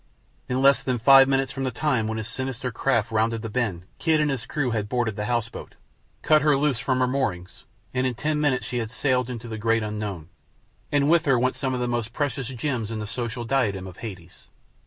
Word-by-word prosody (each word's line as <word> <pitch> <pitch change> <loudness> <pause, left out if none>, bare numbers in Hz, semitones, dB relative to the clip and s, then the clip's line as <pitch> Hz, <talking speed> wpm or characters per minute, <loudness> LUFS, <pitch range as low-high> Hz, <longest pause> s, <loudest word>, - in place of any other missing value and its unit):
In 130 +1 0
less 140 0 +6
than 130 -2 -1
five 135 +3 +7
minutes 135 -1 +1
from 135 0 -4
the 130 - 0
time 125 -3 0
when 110 0 -2
his 110 -1 -4
sinister 130 0 -3
craft 115 -2 0
rounded 110 +1 0
the 115 - -5
bend 100 -8 -2
Kidd 160 -2 +2
and 150 -1 +2
his 130 -4 -4
crew 145 -5 -1
had 105 -2 -2
boarded 120 -3 0
the 105 - -3
house 120 -1 0
boat, - - -10 0.5
cut 155 -1 +5
her 150 -2 +4
loose 140 -4 +1
from 130 +1 0
her 125 - +3
moorings, 95 -10 -3 0.3
and 130 0 +1
in 125 - -2
ten 150 +4 -1
minutes 135 -4 +1
she 125 - -2
had 115 -2 -3
sailed 125 +1 0
away - - -3
into 120 0 -7
the 110 -1 -5
great 115 +1 +2
unknown, 105 -6 -5 0.6
and 145 -1 +3
with 170 +1 +4
her 135 -3 +4
went 130 +2 +1
some 130 -1 -2
of - - -2
the 125 - -1
most 120 -1 -2
precious 140 -3 -2
gems 125 -3 -3
in 115 - -4
the 105 - -4
social 120 +2 -4
diadem 115 -7 0
of 95 -1 -10
Hades. 95 -6 -10
125 Hz, 235 wpm, -25 LUFS, 110-135 Hz, 0.6 s, five